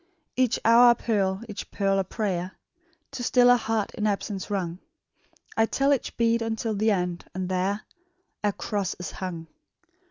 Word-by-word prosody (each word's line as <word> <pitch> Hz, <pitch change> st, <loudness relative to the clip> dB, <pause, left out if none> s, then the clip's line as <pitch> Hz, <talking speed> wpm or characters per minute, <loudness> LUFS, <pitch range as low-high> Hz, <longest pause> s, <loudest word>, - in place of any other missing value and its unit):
"Each 255 Hz, -2 st, +2 dB
hour 235 Hz, +2 st, +8 dB
a 240 Hz, -, +6 dB
pearl, 195 Hz, -4 st, 0 dB
each 210 Hz, -2 st, -7 dB
pearl 195 Hz, -1 st, +1 dB
a -, -, +2 dB
prayer, 185 Hz, -3 st, -3 dB, 0.6 s
To 270 Hz, -3 st, -6 dB
still 245 Hz, 0 st, +5 dB
a -, -, +7 dB
heart 225 Hz, -3 st, -1 dB
in 215 Hz, -2 st, -1 dB
absence 200 Hz, -1 st, -2 dB
wrung; 180 Hz, -4 st, -2 dB, 0.8 s
I 225 Hz, 0 st, +3 dB
tell 275 Hz, +4 st, +2 dB
each 270 Hz, -, -3 dB
bead 230 Hz, 0 st, +2 dB
unto 225 Hz, 0 st, -2 dB
the 215 Hz, +2 st, +1 dB
end, 180 Hz, -4 st, -1 dB
and 185 Hz, -1 st, -2 dB
there 190 Hz, +3 st, -1 dB, 0.6 s
A 205 Hz, -, +3 dB
cross 200 Hz, -1 st, -3 dB
is 180 Hz, -, -6 dB
hung! 175 Hz, -3 st, -5 dB
210 Hz, 165 wpm, -26 LUFS, 190-230 Hz, 0.8 s, hour